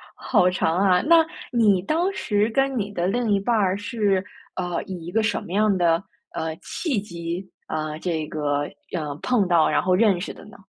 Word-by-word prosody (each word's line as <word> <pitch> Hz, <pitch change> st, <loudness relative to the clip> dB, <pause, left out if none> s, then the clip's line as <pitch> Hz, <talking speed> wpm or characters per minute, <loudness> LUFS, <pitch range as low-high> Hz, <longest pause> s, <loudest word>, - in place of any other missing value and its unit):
好 180 Hz, -, +2 dB
长 175 Hz, -2 st, 0 dB
啊。 185 Hz, -2 st, +4 dB
那 325 Hz, +2 st, +5 dB, 0.3 s
你 210 Hz, -6 st, +3 dB
当 330 Hz, -, 0 dB
时 210 Hz, -, 0 dB
跟 270 Hz, +2 st, +1 dB
你 205 Hz, -1 st, -2 dB
的 175 Hz, -2 st, -1 dB
另 235 Hz, +2 st, 0 dB
一 200 Hz, -, +3 dB
半 230 Hz, +4 st, 0 dB
儿 195 Hz, -3 st, +2 dB
是， 205 Hz, -3 st, 0 dB, 0.3 s
呃， 175 Hz, -2 st, -2 dB
以 180 Hz, -4 st, -7 dB
一 175 Hz, -, -6 dB
个 220 Hz, +3 st, +1 dB
什 225 Hz, -, 0 dB
么 170 Hz, -, -10 dB
样 210 Hz, 0 st, +3 dB
的， 170 Hz, 0 st, +2 dB, 0.3 s
呃， 160 Hz, 0 st, -3 dB
契 275 Hz, -, -2 dB
机， 175 Hz, -1 st, -6 dB, 0.2 s
呃， 155 Hz, -1 st, -3 dB
这 160 Hz, -4 st, -2 dB
个， 145 Hz, -1 st, -1 dB, 0.3 s
呃， 150 Hz, -4 st, -3 dB
碰 235 Hz, -7 st, +2 dB
到， 170 Hz, -3 st, +4 dB
然 -, -, +2 dB
后 185 Hz, 0 st, +2 dB
认 195 Hz, -3 st, +3 dB
识 -, -, -5 dB
的 -, -, -14 dB
呢？ 215 Hz, +4 st, -14 dB
190 Hz, 215 characters per minute, -23 LUFS, 170-220 Hz, 0.3 s, 那